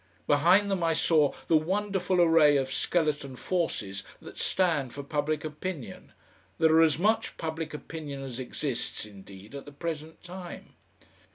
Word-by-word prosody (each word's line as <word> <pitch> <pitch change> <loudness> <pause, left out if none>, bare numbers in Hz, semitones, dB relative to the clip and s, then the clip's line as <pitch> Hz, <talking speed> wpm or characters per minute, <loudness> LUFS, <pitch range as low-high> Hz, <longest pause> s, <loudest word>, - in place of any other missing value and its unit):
Behind 180 +8 +4
them 190 -2 0
I 165 -1 +2
saw 155 -2 +3
the 165 - +3
wonderful 190 +2 +1
array 165 -4 +6
of 130 -1 -1
skeleton 150 -3 0
forces 115 - -2 0.2
that - - -11
stand 160 -9 +1
for 140 - -5
public 150 +1 -1
opinion, 155 -2 -6 0.4
that 160 -1 +4
are 160 +1 +6
as 155 -3 +4
much 215 +6 +1
public 160 -1 -4
opinion 150 -2 -6
as 130 -2 -6
exists 130 -2 -3
indeed 100 +1 -13
at 140 -1 -7
the 145 - -10
present 160 +1 -6
time. 180 0 -9
155 Hz, 150 wpm, -28 LUFS, 140-175 Hz, 0.4 s, array